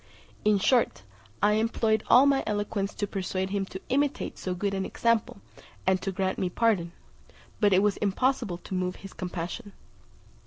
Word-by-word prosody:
In 210 Hz, -1 st, +4 dB
short, 235 Hz, -, +2 dB, 0.4 s
I 205 Hz, -, +5 dB
employed 220 Hz, -1 st, +1 dB
all 255 Hz, +3 st, +7 dB
my 275 Hz, -1 st, +3 dB
eloquence 205 Hz, -1 st, -2 dB
to 205 Hz, -, -1 dB
persuade 190 Hz, -1 st, -3 dB
him 200 Hz, -1 st, 0 dB
to 190 Hz, -, -7 dB
imitate 285 Hz, +2 st, 0 dB
so 185 Hz, -1 st, -3 dB
good 195 Hz, +2 st, -1 dB
an 190 Hz, -1 st, -1 dB
example, 230 Hz, -1 st, 0 dB, 0.4 s
and 190 Hz, 0 st, +2 dB
to 195 Hz, -, -2 dB
grant 190 Hz, 0 st, -1 dB
me 185 Hz, -, 0 dB
pardon; 195 Hz, -5 st, +1 dB, 0.7 s
but 205 Hz, -3 st, +4 dB
it 190 Hz, +1 st, +4 dB
was 210 Hz, -1 st, +2 dB
impossible 210 Hz, -1 st, 0 dB
to 185 Hz, -, -9 dB
move 185 Hz, 0 st, -1 dB
his 195 Hz, -, -11 dB
compassion. 180 Hz, +4 st, -5 dB
200 Hz, 165 wpm, -27 LUFS, 190-225 Hz, 0.7 s, all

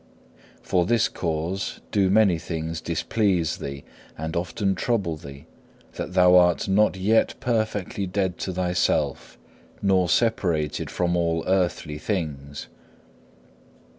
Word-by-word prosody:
For 90 Hz, -1 st, +1 dB
this 115 Hz, +1 st, +3 dB
cause 85 Hz, +3 st, -3 dB
do 100 Hz, -2 st, +2 dB
many 100 Hz, -4 st, +4 dB
things 80 Hz, 0 st, -4 dB
displease 85 Hz, -1 st, 0 dB
thee 70 Hz, 0 st, -6 dB, 0.3 s
and 80 Hz, +3 st, -4 dB
often 95 Hz, +3 st, -1 dB
trouble 95 Hz, -5 st, -1 dB
thee, 70 Hz, -1 st, -11 dB, 0.5 s
that 90 Hz, -, -6 dB
thou 90 Hz, -1 st, +6 dB
art 90 Hz, -1 st, +3 dB
not 100 Hz, +1 st, +3 dB
yet 105 Hz, +4 st, +2 dB
perfectly 110 Hz, -4 st, -1 dB
dead 95 Hz, -1 st, -1 dB
to 95 Hz, -, -3 dB
thyself 90 Hz, 0 st, -1 dB, 0.4 s
nor 95 Hz, -3 st, +2 dB
separated 85 Hz, -10 st, 0 dB
from 90 Hz, -1 st, 0 dB
all 85 Hz, -1 st, 0 dB
earthly 90 Hz, -5 st, 0 dB
things. 75 Hz, -8 st, -4 dB
90 Hz, 115 wpm, -24 LUFS, 80-100 Hz, 0.5 s, thou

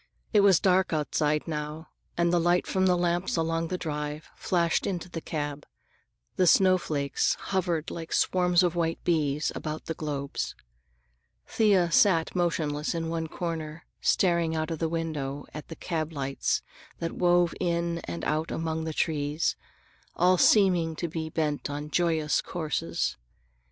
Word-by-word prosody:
It 210 Hz, -, +6 dB
was 200 Hz, -4 st, +6 dB
dark 185 Hz, -2 st, +2 dB
outside 150 Hz, 0 st, 0 dB
now, 150 Hz, 0 st, -5 dB, 0.3 s
and 170 Hz, 0 st, +2 dB
the 175 Hz, -, +4 dB
light 175 Hz, +1 st, +2 dB
from 190 Hz, 0 st, +1 dB
the 180 Hz, -, +4 dB
lamps 175 Hz, +1 st, 0 dB
along 165 Hz, 0 st, 0 dB
the 185 Hz, -, -2 dB
drive 150 Hz, -2 st, -5 dB
flashed 170 Hz, -2 st, +1 dB
into 180 Hz, -2 st, -3 dB
the 170 Hz, -2 st, -6 dB
cab. 145 Hz, -2 st, -4 dB, 0.7 s
The 185 Hz, -, +4 dB
snowflakes 165 Hz, -7 st, +3 dB
hovered 175 Hz, -5 st, -2 dB
like 165 Hz, -1 st, -7 dB
swarms 180 Hz, -1 st, +3 dB
of 175 Hz, -2 st, +2 dB
white 165 Hz, -1 st, 0 dB
bees 150 Hz, -3 st, +1 dB
about 155 Hz, 0 st, -5 dB
the 160 Hz, -, -3 dB
globes. 145 Hz, -3 st, -4 dB, 0.9 s
Thea 195 Hz, -6 st, +3 dB
sat 165 Hz, -1 st, +4 dB
motionless 155 Hz, -4 st, 0 dB
in 165 Hz, -1 st, -2 dB
one 165 Hz, -1 st, -2 dB
corner 160 Hz, -2 st, -5 dB, 0.2 s
staring 170 Hz, -3 st, +2 dB
out 160 Hz, +1 st, -2 dB
of 160 Hz, -, -3 dB
the 165 Hz, -, 0 dB
window 150 Hz, -4 st, -3 dB
at 150 Hz, -, -8 dB
the 165 Hz, -, -8 dB
cab 160 Hz, -2 st, -3 dB
lights 135 Hz, -2 st, -1 dB, 0.3 s
that 165 Hz, -, -3 dB
wove 175 Hz, -1 st, +3 dB
in 170 Hz, 0 st, 0 dB
and 85 Hz, 0 st, -5 dB
out 155 Hz, +2 st, 0 dB
among 160 Hz, 0 st, -2 dB
the 160 Hz, -, -3 dB
trees, 150 Hz, 0 st, 0 dB, 0.6 s
all 180 Hz, +1 st, +4 dB
seeming 180 Hz, -6 st, +4 dB
to 170 Hz, -, -3 dB
be 160 Hz, -1 st, -4 dB
bent 150 Hz, -2 st, -1 dB
upon 145 Hz, +1 st, -5 dB
joyous 160 Hz, -3 st, +1 dB
courses. 150 Hz, -, -2 dB
165 Hz, 150 wpm, -27 LUFS, 150-175 Hz, 0.9 s, It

